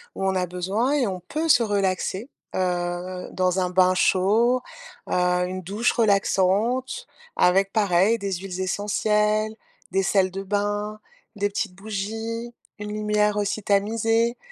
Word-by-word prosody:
où 195 - -2
on 190 0 +1
a 185 -1 +1
besoin 190 - -1
et 275 -5 +2
on 185 -2 -3
peut 310 - -3
se 265 - +6
relaxer, 200 +2 -1 0.3
heu, 180 0 -2
dans 185 0 +1
un 180 -1 0
bain 185 0 +4
chaud, 220 +8 +3 0.5
heu, - - -2 0.3
une 185 +1 -5
douche 205 +7 0
relaxante 225 - +1 0.3
avec 195 +2 +3
pareil 200 +1 +3
des 200 -1 -3
huiles 185 0 -5
essentielles, 210 +2 +1 0.4
des 195 +1 +1
sels 190 -1 +2
de 195 +1 -5
bain, 205 +1 -2 0.4
des 205 0 0
petites 190 -2 -3
bougies, 220 +4 -5 0.3
une 210 0 -5
lumière 210 0 +1
aussi 205 +1 -1
tamisée. 225 +4 +1
200 Hz, 140 wpm, -24 LUFS, 185-220 Hz, 0.5 s, se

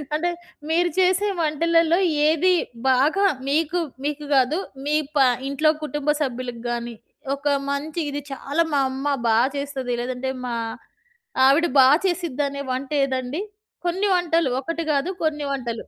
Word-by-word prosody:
అంటే, 340 +3 0 0.4
మీరు 345 +2 +2
చేసే 370 +2 +3
వంటలలో 330 +2 +2 0.3
ఏది 325 +4 +3 0.4
బాగా 290 +10 +3 0.2
మీకు, 320 +4 +1 0.3
మీకు‌ 295 0 -3
గాదు, 275 +5 +3 0.3
మీ 295 +1 +1 0.2
ప - - +1 0.3
ఇంట్లో 305 +3 +3
కుటుంబ 295 -1 -3
సభ్యులకు 250 -3 -3
గానీ, 235 0 -4 0.4
ఒక 280 +1 -18 0.3
మంచి, 300 +4 -3
ఇది 290 +1 -3
చాలా 280 +4 0
మా 285 - +3
అమ్మ 270 +2 -4 0.2
బా 225 -1 +4 0.2
చేస్తది, 275 -3 -3
లేదంటే 255 +1 -3
మా 240 - -2 0.9
ఆవిడ 290 +5 +4
బా 260 - +8 0.2
చేసిద్దనే 290 -6 -2
వంటేదండి? 270 +2 -1 0.4
కొన్ని 370 +4 +1
వంటలు 335 -4 +1
ఒకటి 330 +4 -3
గాదు, 290 +5 0
కొన్ని 300 -2 0
వంటలు. 240 -4 -3
290 Hz, 130 wpm, -23 LUFS, 265-330 Hz, 0.9 s, బా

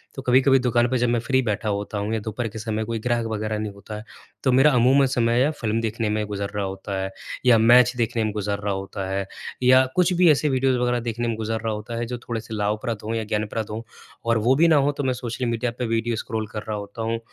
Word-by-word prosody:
तो 135 - -5
कभी-कभी 130 +1 +4
दुकान 120 -1 +2
पे 130 - +1
जब 120 0 +1
मैं 120 0 +2
फ्री 130 +3 +1
बैठा 110 -2 -2
होता 105 +1 -3
हूँ 105 +2 -2
या 110 - 0
दोपहर 110 +2 -4
के 110 +1 -7
समय 110 0 -2
कोई 115 0 -3
ग्राहक 120 0 0
वगैरह 110 0 -2
नहीं 105 -1 -3
होता 100 +2 -9
है, 105 - -8 0.4
तो 130 - +3
मेरा 135 +4 +5
अमूमन 130 +3 +5
समय 120 -1 +2
या 140 - +3
फ़िल्म 115 -7 -2
देखने 115 0 -2
में 105 0 0
गुज़र 100 -1 -3
रहा 100 -1 -1
होता 95 +1 -5
है 95 0 -3 0.3
या 125 -2 +7
मैच 120 +2 +6
देखने 115 -1 0
में 110 - -1
गुज़र 100 -1 -2
रहा 100 -1 -2
होता 95 0 -5
है 95 0 -1 0.4
या 130 +1 +6
कुछ 180 0 +3
भी 180 -1 +5
ऐसे 150 +1 +2
वीडियोज़ 130 -1 +2
वगैरह 125 0 +1
देखने 120 0 -3
में 115 - -1
गुज़र 110 0 -2
रहा 110 -1 -1
होता 105 +2 -6
है 120 - -2
जो 125 +1 -4
थोड़े-से 115 -1 -6
लाभप्रद 105 +1 -1
हों 110 +2 -3
या 115 - -1
ज्ञानप्रद 110 0 -3
हों। 110 +1 -4 0.4
और 115 0 +2
वो 120 +5 +3
भी 165 +4 +5
ना 160 - +5
हों, 145 0 +3
तो 145 0 -4
मैं 130 -1 +1
सोशल 125 0 -4
मीडिया 115 0 -1
पे 125 - 0
वीडियो 115 +1 0
स्क्रॉल 110 0 -3
कर 105 - -5
रहा 110 -1 -2
होता 100 +2 -7
हूँ, 115 +1 -1
115 Hz, 260 wpm, -23 LUFS, 105-125 Hz, 0.4 s, या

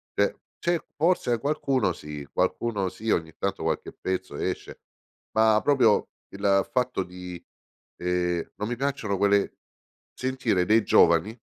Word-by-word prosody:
cioè - - +2 0.2
c'è 170 0 +1 0.2
forse 155 -7 +2
qualcuno 135 - +1
sì, 75 -3 -8
qualcuno 100 +1 0
sì, 110 +4 -6
ogni 80 -1 0
tanto 100 - -2
qualche - - -2
pezzo 95 -5 -4
esce, - - -4 0.6
ma 110 -1 +5
proprio 125 -7 +4 0.2
il 100 0 +1
fatto 125 -6 0
di, 90 -1 -9 0.6
ehm, 90 -1 -1
non 105 - -3
mi 120 - -2
piacciono 125 -7 -1
quelle 100 0 +2 0.6
sentire 130 -8 0
dei 110 0 +4
giovani 85 +7 +4
100 Hz, 130 wpm, -26 LUFS, 90-125 Hz, 0.6 s, ma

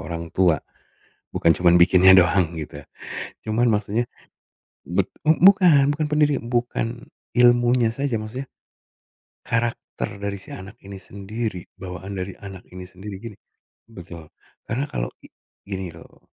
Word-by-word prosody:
orang 85 -1 -6
tua, 90 -4 +4 0.8
bukan 85 - +4
cuma 90 +1 +1
bikinnya 95 +1 +7
doang 90 -2 +4
gitu 75 -2 -7 0.6
cuman 110 +3 +1
maksudnya, 110 +1 +1 0.8
bet - - 0
bukan 160 -3 +6
bukan 150 +1 -1
pendiri 150 -1 +2
bukan 120 -1 -1 0.5
ilmunya 120 -1 +4
saja 135 -1 -1
maksudnya, 115 +5 -6 1.0
karakter 115 -3 -2
dari 100 0 -3
si 95 - -10
anak 95 +2 -9
ini 100 0 -9
sendiri 100 0 -5 0.2
bawaan 95 +1 -7
dari 95 0 -4
anak 95 -2 -9
ini 90 - -7
sendiri 95 +3 -9
gini, 115 -4 -8 0.5
betul 85 -6 -11 0.4
karena 125 +6 -1
kalau - - -3 0.2
i - - -12 0.4
gini 95 -2 -5
loh. 85 0 -15
100 Hz, 130 wpm, -23 LUFS, 90-120 Hz, 1.0 s, bikinnya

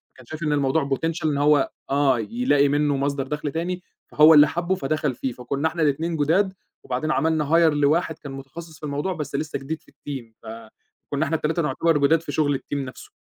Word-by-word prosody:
كان 130 - -16
شايف 155 +5 -7
إن 150 -1 +1
الموضوع 140 +1 +1
Potential 160 +4 -2
إن 150 -2 +1
هو 145 -1 +3 0.2
آه 135 -3 +2
يلاقي 145 - +2
منه 145 0 +1
مصدر 140 0 -1
دَخْل 150 0 -3
تاني، 180 +4 -3 0.2
فهو 155 +2 +6
اللي 150 0 +8
حَبّه 175 +3 -1
فدخل 150 -3 -1
فيه، 130 - -3
فكنا 135 +5 -2
إحنا 165 +1 -3
الاتنين 160 +3 0
جداد، 180 +7 +2 0.3
وبعدين 130 +5 -2
عملنا 160 0 +1
Hire 165 -1 +5
لواحد 150 +3 +1
كان 140 - -8
متخصص 145 +4 -10
في - - -24
الموضوع، 145 +6 -2
بس 150 -3 -5
لسه 150 0 -3
جديد 150 +4 -5
في - - -23
الTeam 130 -6 -8
فكنا 115 +6 -6
إحنا 160 - -1
ال3 160 +2 0
نعتبر 155 +2 +1
جداد 150 +3 +3
في 160 - -6
شغل 145 -1 +1
الTeam 145 - -7
نَفْسه، 135 -2 -7
150 Hz, 200 wpm, -23 LUFS, 140-160 Hz, 0.3 s, اللي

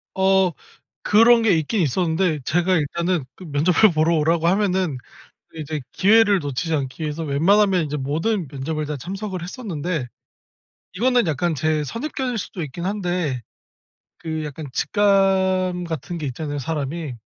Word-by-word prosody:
어. 190 -1 +3 0.6
그런 230 +2 +6
게 225 - +3
있긴 160 +7 -1
있었는데 160 +2 +1
제가 175 +5 +1
일단은 170 +1 0
그 185 - -11
면접을 170 +7 +3
보러 160 +2 +2
오라고 165 +2 +2
하면은 185 -7 +1 0.5
그 - - -13
이제 155 -1 -4
기회를 205 0 +4
놓치지 145 +2 -3
않기 135 +1 -3
위해서 155 +1 -3
웬만하면 185 +6 +3
인제 150 0 -3
모든 160 +8 -1
면접을 150 +2 -4
다 150 - -3
참석을 190 - -5
했었는데. 175 - -4 0.9
이거는 245 +1 +2
약간 160 +1 0
제 155 +1 0
선입견일 250 - -3
수도 185 -3 -5
있긴 155 +4 -6
한데 180 - -2 0.8
그 160 -1 -4
약간 150 +1 -7
직감 190 - +2
같은 165 +1 -5
게 150 - -4
있잖아요, 145 +3 -4
사람이. 150 0 -4
170 Hz, 315 characters per minute, -22 LUFS, 150-190 Hz, 0.9 s, 그런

